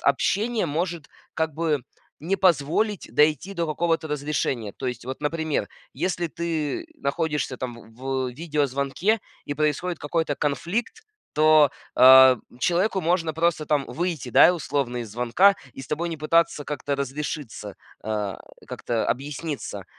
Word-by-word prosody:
общения 210 - +1
может, 165 +1 -2 0.3
как 160 -1 -1
бы, 155 -3 0 0.4
не 180 +5 -1
позволить 185 +3 +1
дойти 155 +5 +3
до 170 -3 -2
какого-то 165 +1 0
разрешения. 140 -7 -2
То 135 - -6
есть, 125 -2 -4
вот, 130 +1 -6
например, 155 -6 -1 0.2
если 175 +3 -2
ты 165 - -3
находишься 150 - -2
там 125 -2 -4 0.2
в - - -23
в 130 0 -2
видеозвонке 145 - 0 0.3
и 145 - -3
происходит 155 +3 -1
какой-то 150 0 -1
конфликт, 180 - -2 0.3
то, 155 -1 +6 0.2
а, 130 0 +9 0.2
человеку 185 +3 +1
можно 165 -1 +1
просто 165 0 +1
там 145 -2 +1
выйти, 170 -6 -3
да, 120 - +7
и - - +6
условно 140 -7 -2
из 115 -4 -6
звонка 125 - +4 0.2
и - - -9
с - - -10
тобой 165 +5 -2
не 165 - -4
пытаться 155 -1 +2
как-то 145 -1 -3
разрешиться, 140 -6 -5 0.3
а, 105 -3 -3 0.3
как-то 115 -2 -2
объясниться. 145 +3 -4
150 Hz, 140 wpm, -24 LUFS, 135-170 Hz, 0.4 s, а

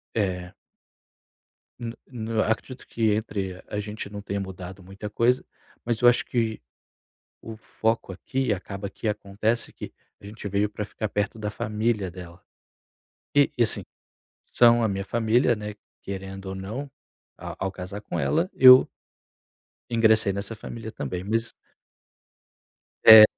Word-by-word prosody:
eh. 90 -4 -1 1.3
No 115 -1 -4 0.2
no 115 -3 -2
acredito 120 +4 -3
que 110 -2 +1
entre 95 -4 -3
a 105 - -3
gente 105 0 -5
não 105 0 -7
tenha 100 0 -3
mudado 95 0 -7
muita 95 +3 -8
coisa, 120 +4 +2 0.4
mas 120 -2 -1
eu 120 - +7
acho 120 - +4
que 115 - -1 0.8
o 115 - -8
foco 110 -1 -2
aqui, 130 +6 -2
acaba 100 +1 -6
que 105 - -5
acontece 105 +2 0
que - - -9 0.3
a - - -15
gente 105 +1 -7
veio 100 +1 +1
para 105 0 -4
ficar 105 +1 -4
perto 105 +2 -1
da 105 -1 -3
família 105 -2 -1
dela. 90 0 -11 0.9
E 145 -1 +5
e 120 - +5
assim, 115 - +3 0.6
são 120 -1 +5
a 110 - +2
minha 100 -1 -2
família, 120 +3 +2
né, 105 -1 -6 0.3
querendo 95 0 -6
ou 95 - -4
não, 110 +9 -5 0.5
a - - -7
ao 95 - 0
casar 95 +2 -7
com 105 - -5
ela 170 +4 +1
eu 130 0 +9 1.0
ingressei 110 -3 +4
nessa 100 +3 -4
família 110 +1 -7
também 90 +3 -4
mas 115 +3 0 1.5
é, 110 -1 +12
105 Hz, 145 wpm, -26 LUFS, 100-115 Hz, 1.5 s, é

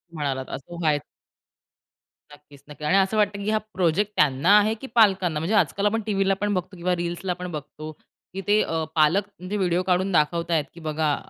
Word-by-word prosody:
म्हणालात, 135 -3 -2
असं 170 +6 -8
व्हायचं. 150 -3 +1 1.3
नक्कीच, 145 -1 -18
नक्कीच 150 0 -6
आणि 190 - +4
असं 195 +3 +2
वाटतं 205 -1 +1
की 210 - -2
हा 215 - +2 0.2
प्रोजेक्ट 185 +3 +1
त्यांना 150 +8 +4
आहे 215 +1 +3
की 270 - -6
पालकांना? 190 -8 +3
म्हणजे 175 +8 -1
आजकाल 200 +1 +1
आपण 225 +2 +1
टीव्हीला 195 -2 +1
पण 205 0 0
बघतो, 185 +1 -3
किंवा 180 +1 0
रील्सला 175 +2 -3
पण 180 0 -7
बघतो 155 +1 -7 0.4
की 195 - -4
ते 210 +1 +4
अ, 165 -1 -1
पालक 160 +6 +4 0.3
जे 210 - -1
व्हिडिओ 180 -1 +1
काढून 185 +2 +1
दाखवताय 170 0 +1
की 170 - -13
बघा, 155 -2 -1
175 Hz, 185 wpm, -24 LUFS, 155-200 Hz, 1.3 s, आणि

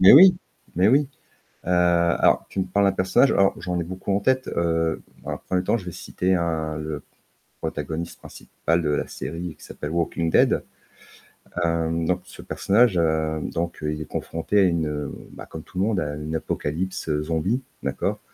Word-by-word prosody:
Mais 95 - +9
oui, 180 +5 +9 0.4
mais 90 +4 +4
oui, 140 +3 +4 0.6
heu, - - -3
alors 85 -1 +3
tu 95 - -2
me - - +1
parles 100 +2 +2
d'un 95 - +3
personnage, 95 +9 +3
alors 100 0 +3
j'en 90 -2 -1
ai - - 0
beaucoup 95 +3 -4
en 100 - +1
tête, 130 +4 +2
heu, 80 -1 0 0.2
dans - - -4
1er 90 0 -1
temps, 115 - +2
je 90 - -10
vais 90 - -5
citer 95 +3 -1
un 80 -3 -1
le 75 -1 -4 0.6
protagoniste 80 +3 -4
principal 80 +2 -2
de 75 - 0
la 75 - 0
série 85 +1 -5
qui - - -14
s'appelle 75 - -6
Walking 85 0 0
Dead, - - +4 1.0
hem, 85 0 0
donc 90 +2 0
ce - - -11
personnage, 105 -1 +3
heu, 80 -1 +1
donc 85 -1 -3
heu, 75 0 0
il 75 - -5
est - - -4
confronté 85 +8 -1
à - - +6
une, 85 -4 +2
heu, 75 -1 -3 0.2
bah, - - -9
comme 80 - -8
tout - - -13
le - - +3
monde 110 -3 +1
à 75 -4 -2
une 75 +2 -4
apocalypse, 80 +4 -3
heu, 75 0 +1
zombie, 85 +10 0 0.2
d'accord? - - -1
85 Hz, 195 wpm, -24 LUFS, 80-95 Hz, 1.0 s, Mais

